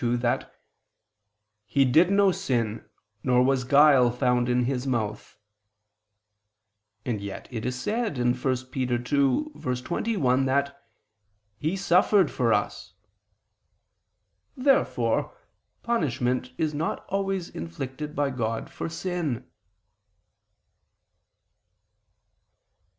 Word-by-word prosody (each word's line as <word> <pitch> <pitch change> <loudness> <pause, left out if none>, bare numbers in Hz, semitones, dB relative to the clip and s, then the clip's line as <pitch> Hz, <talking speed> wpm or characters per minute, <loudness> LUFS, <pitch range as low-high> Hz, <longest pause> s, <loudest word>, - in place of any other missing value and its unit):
2:22) 120 0 +1
that 120 0 -2 1.1
"He 140 -1 +3
did 160 +8 +4
no 200 -1 +4
sin, 115 -9 -2 0.3
nor 125 0 +3
was 130 0 +2
guile 140 -1 +6
found 125 0 +1
in 125 0 +2
His 130 +1 -2
mouth." 110 -5 -3 1.7
And 110 -5 -2
yet 100 -1 -7
it 115 -2 -4
is 125 0 -3
said 215 - -2
(1 120 0 +2
Pet. 125 - -9
2:21) 130 - 0
that 140 +1 -1 0.8
"He 160 +5 -1
suffered 190 +2 +3
for - - +1
us." - - -2 1.6
Therefore 275 - +1 0.5
punishment 125 - -1
is 155 -1 0
not 155 +3 -3
always 195 -2 -2
inflicted 130 - -6
by 145 -1 0
God 115 -3 -3
for - - -5
sin. 165 -6 -3
130 Hz, 95 wpm, -26 LUFS, 125-165 Hz, 1.7 s, guile